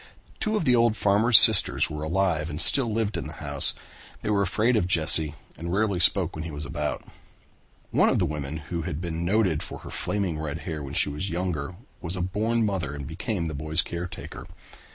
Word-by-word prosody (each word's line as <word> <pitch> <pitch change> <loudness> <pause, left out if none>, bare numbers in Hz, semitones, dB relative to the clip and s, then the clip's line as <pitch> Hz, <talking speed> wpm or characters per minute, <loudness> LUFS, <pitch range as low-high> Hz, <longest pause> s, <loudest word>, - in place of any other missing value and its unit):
Two 215 0 -1
of 210 - -1
the 125 - +4
old 115 -2 +2
farmer's 105 +4 +5
sisters - - +7
were 75 0 -7
alive 85 -1 -1
and 75 -1 -5
still 120 - +5
lived 105 -3 -2
in - - -5
the - - -7
house. - - +1 0.5
They - - -1
were 100 -1 +2
afraid 105 +6 +1
of 90 -5 +1
Jesse 80 -3 0 0.2
and 85 +1 -6
rarely 100 -1 0
spoke 90 0 +4
when 80 - -5
he 80 - -6
was 75 0 -7
about. 70 - -4 0.9
One - - +3
of - - +1
the 90 - +1
women 75 -1 -5 0.2
who 85 - -2
had 80 -3 -5
been 85 -1 -4
noted 95 -4 +1
for - - -6
her - - -8
flaming 95 -7 -2
red 80 +1 -5
hair 80 -4 -5
when 70 0 -7
she - - +2
was 75 +7 -4
younger 85 -2 -3 0.3
was 85 +2 -5
a 90 - -3
born 110 +5 0
mother 90 -8 -3
and 70 -1 -7
became 85 - -4
the 80 - -4
boy's 80 +3 -1
caretaker. 85 -1 -7
85 Hz, 210 wpm, -25 LUFS, 80-100 Hz, 0.9 s, sisters